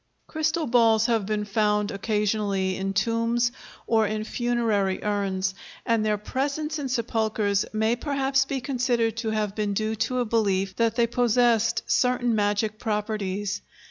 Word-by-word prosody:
Crystal 315 Hz, +1 st, -1 dB
balls 230 Hz, -3 st, +4 dB
have 225 Hz, -5 st, +1 dB
been 210 Hz, -1 st, -1 dB
found 210 Hz, 0 st, +1 dB
occasionally 200 Hz, -2 st, 0 dB
in 195 Hz, +1 st, -2 dB
tombs 230 Hz, +4 st, +1 dB, 0.3 s
or 220 Hz, -2 st, +2 dB
in 215 Hz, +1 st, -2 dB
funerary 225 Hz, -5 st, 0 dB
urns, 195 Hz, -2 st, -1 dB, 0.3 s
and 230 Hz, -2 st, +2 dB
their 215 Hz, -1 st, +1 dB
presence 285 Hz, +8 st, -2 dB
in 275 Hz, -2 st, -3 dB
sepulchres 220 Hz, -4 st, 0 dB
may 220 Hz, +2 st, +1 dB
perhaps 270 Hz, 0 st, +1 dB
be 270 Hz, -1 st, -3 dB
considered 245 Hz, -4 st, 0 dB
to 225 Hz, -1 st, -2 dB
have 215 Hz, -2 st, -1 dB
been 210 Hz, -1 st, -2 dB
due 215 Hz, +1 st, 0 dB
to 225 Hz, +4 st, -1 dB
a 245 Hz, -, +1 dB
belief 195 Hz, -4 st, 0 dB
that 230 Hz, -1 st, +1 dB
they 235 Hz, -1 st, +3 dB
possessed 235 Hz, -1 st, +2 dB
certain 250 Hz, -1 st, +1 dB
magic 210 Hz, 0 st, 0 dB
properties. 205 Hz, -3 st, -2 dB
220 Hz, 145 wpm, -25 LUFS, 205-240 Hz, 0.3 s, balls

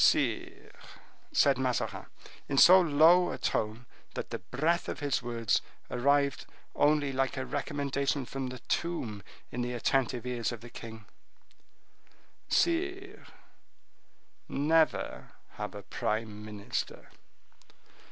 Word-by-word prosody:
"Sire," -, -, +1 dB, 0.6 s
said 135 Hz, -2 st, +4 dB
Mazarin, 130 Hz, -2 st, -1 dB, 0.4 s
in 140 Hz, -, -1 dB
so 185 Hz, +6 st, +9 dB
low 170 Hz, +3 st, +5 dB
a -, -, -4 dB
tone 110 Hz, +3 st, -2 dB, 0.3 s
that -, -, -5 dB
the -, -, -3 dB
breath 160 Hz, +6 st, 0 dB
of -, -, -4 dB
his 140 Hz, -4 st, 0 dB
words 115 Hz, -2 st, 0 dB, 0.3 s
arrived 140 Hz, +1 st, +2 dB, 0.3 s
only 145 Hz, -1 st, +3 dB
like 135 Hz, +1 st, -1 dB
a 130 Hz, -, -2 dB
recommendation 140 Hz, -1 st, -1 dB
from 135 Hz, +1 st, -4 dB
the 130 Hz, 0 st, -6 dB
tomb 125 Hz, -9 st, -2 dB, 0.3 s
in 125 Hz, -, -3 dB
the 120 Hz, 0 st, -2 dB
attentive 125 Hz, 0 st, 0 dB
ears 125 Hz, -2 st, -1 dB
of 120 Hz, -, -7 dB
the 120 Hz, 0 st, -11 dB
king—"Sire, 345 Hz, -, -5 dB, 1.2 s
never 160 Hz, +3 st, +1 dB, 0.2 s
have 105 Hz, 0 st, -5 dB
a 100 Hz, -, -7 dB
prime 105 Hz, +1 st, -3 dB
minister." 105 Hz, +2 st, -5 dB
135 Hz, 115 wpm, -30 LUFS, 120-150 Hz, 1.2 s, so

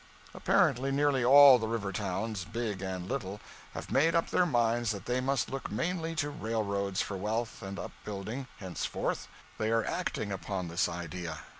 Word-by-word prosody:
Apparently, 135 Hz, +3 st, +2 dB
nearly 140 Hz, -2 st, +2 dB
all 135 Hz, 0 st, +9 dB
the 110 Hz, -, -2 dB
river 110 Hz, -3 st, -2 dB
towns, 100 Hz, +1 st, -2 dB
big 110 Hz, -3 st, -3 dB
and 95 Hz, -2 st, -4 dB
little, 105 Hz, -7 st, -3 dB, 0.4 s
have -, -, -6 dB
made 165 Hz, +5 st, +3 dB
up 165 Hz, -, +1 dB
their 180 Hz, -, +3 dB
minds 120 Hz, -4 st, +2 dB
that 100 Hz, -4 st, -3 dB
they 125 Hz, +1 st, 0 dB
must 130 Hz, -2 st, 0 dB
look 135 Hz, -1 st, -4 dB
mainly 165 Hz, -, -2 dB
to 145 Hz, -2 st, -1 dB
railroads 100 Hz, -6 st, -1 dB
for 100 Hz, -, -5 dB
wealth 110 Hz, +4 st, -2 dB
and 95 Hz, 0 st, -6 dB
upbuilding, 105 Hz, +6 st, -6 dB
henceforth. 95 Hz, -3 st, -3 dB, 0.3 s
They 110 Hz, -, +1 dB
are 115 Hz, -1 st, +2 dB
acting 100 Hz, -, -2 dB
upon 95 Hz, -2 st, -3 dB
this 85 Hz, +1 st, +1 dB
idea. 85 Hz, -1 st, -5 dB
110 Hz, 165 wpm, -31 LUFS, 95-130 Hz, 0.4 s, all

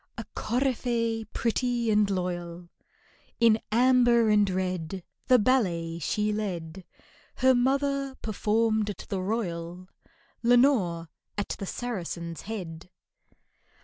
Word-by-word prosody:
A -, -, -5 dB
coryphée, 235 Hz, -2 st, -1 dB
pretty 240 Hz, -1 st, 0 dB
and 210 Hz, -1 st, +3 dB
loyal, 175 Hz, -2 st, -4 dB, 0.7 s
In 225 Hz, -1 st, +5 dB
amber 240 Hz, -1 st, +4 dB
and 205 Hz, -1 st, +4 dB
red 185 Hz, -1 st, -3 dB, 0.2 s
The 255 Hz, -, +7 dB
ballet 180 Hz, -9 st, +1 dB
she 210 Hz, +6 st, 0 dB
led; 185 Hz, -4 st, -4 dB, 0.5 s
Her 260 Hz, 0 st, +4 dB
mother 275 Hz, +2 st, +1 dB
performed 220 Hz, 0 st, +1 dB
at 200 Hz, -, -6 dB
the 190 Hz, -2 st, -2 dB
Royal, 180 Hz, -4 st, -3 dB, 0.5 s
LENORE 235 Hz, -9 st, +3 dB, 0.3 s
at 205 Hz, -, -2 dB
the 195 Hz, -, -4 dB
Saracen's 170 Hz, -9 st, -5 dB
Head. 175 Hz, -6 st, -6 dB
210 Hz, 105 wpm, -27 LUFS, 180-240 Hz, 0.7 s, The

